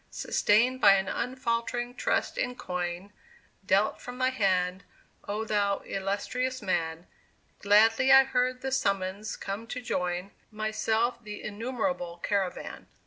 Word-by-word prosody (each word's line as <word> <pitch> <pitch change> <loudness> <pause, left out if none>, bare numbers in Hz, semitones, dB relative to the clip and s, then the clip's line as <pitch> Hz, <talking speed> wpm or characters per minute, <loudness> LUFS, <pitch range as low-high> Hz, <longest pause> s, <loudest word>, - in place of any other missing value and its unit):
Sustained 245 +5 +2
by 200 - +8
an 190 0 0
unfaltering 240 0 -2
trust - - -1
in 250 0 -2
coin, 180 0 -4 0.5
Dealt 200 +2 +2
from 245 0 -8
thy 255 0 +2
hand, 185 -5 +1 0.4
O 210 +2 -2
thou 205 -2 +1
illustrious 250 +7 -2
man, 165 -5 -2 0.5
Gladly 225 +5 +5
I 270 0 +9
heard 255 -1 0
the 265 - -3
summons 200 -3 -1
come 200 +4 -5
to 250 - -4
join 180 -4 -2 0.2
Myself 220 +2 -1
the 210 -1 -8
innumerable 225 -4 -3
caravan. 190 0 -3
215 Hz, 125 wpm, -28 LUFS, 195-250 Hz, 0.5 s, I